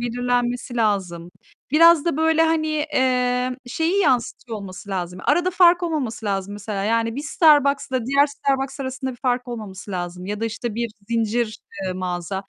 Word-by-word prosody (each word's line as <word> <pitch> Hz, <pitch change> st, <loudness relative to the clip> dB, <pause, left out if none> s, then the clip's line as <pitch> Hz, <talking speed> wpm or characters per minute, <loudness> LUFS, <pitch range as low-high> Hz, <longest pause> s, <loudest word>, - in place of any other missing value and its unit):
belirlenmesi 245 Hz, 0 st, -1 dB
lazım. 185 Hz, -6 st, -1 dB, 0.4 s
Biraz 330 Hz, +1 st, +6 dB
da 340 Hz, -5 st, 0 dB
böyle 320 Hz, +1 st, +3 dB
hani, 320 Hz, -1 st, +1 dB, 0.3 s
eee, 250 Hz, -1 st, +1 dB
şeyi 330 Hz, +9 st, 0 dB
yanıstıyor 245 Hz, -, 0 dB
olması 195 Hz, 0 st, -9 dB
lazım. 180 Hz, -1 st, -4 dB
Arada 350 Hz, +1 st, +2 dB
fark 355 Hz, -1 st, +5 dB
olmaması 260 Hz, -10 st, -2 dB
lazım 195 Hz, 0 st, -2 dB
mesela. 205 Hz, -1 st, -4 dB
Yani 230 Hz, +2 st, 0 dB
bir 285 Hz, -, -3 dB
Starbucks'la 280 Hz, -5 st, +3 dB
diğer 280 Hz, +2 st, +4 dB
Starbucks 275 Hz, -1 st, -2 dB
arasında 260 Hz, 0 st, -4 dB
bir -, -, -12 dB
fark 250 Hz, -1 st, 0 dB
olmaması 210 Hz, -4 st, -7 dB
lazım 180 Hz, 0 st, -5 dB
ya 210 Hz, +1 st, -4 dB
da -, -, -1 dB
işte 230 Hz, 0 st, -4 dB
bir 235 Hz, 0 st, -2 dB, 0.2 s
zincir, 230 Hz, -1 st, 0 dB, 0.3 s
eee, 185 Hz, -, -1 dB
mağaza 180 Hz, 0 st, -4 dB
245 Hz, 160 wpm, -22 LUFS, 205-280 Hz, 0.4 s, Biraz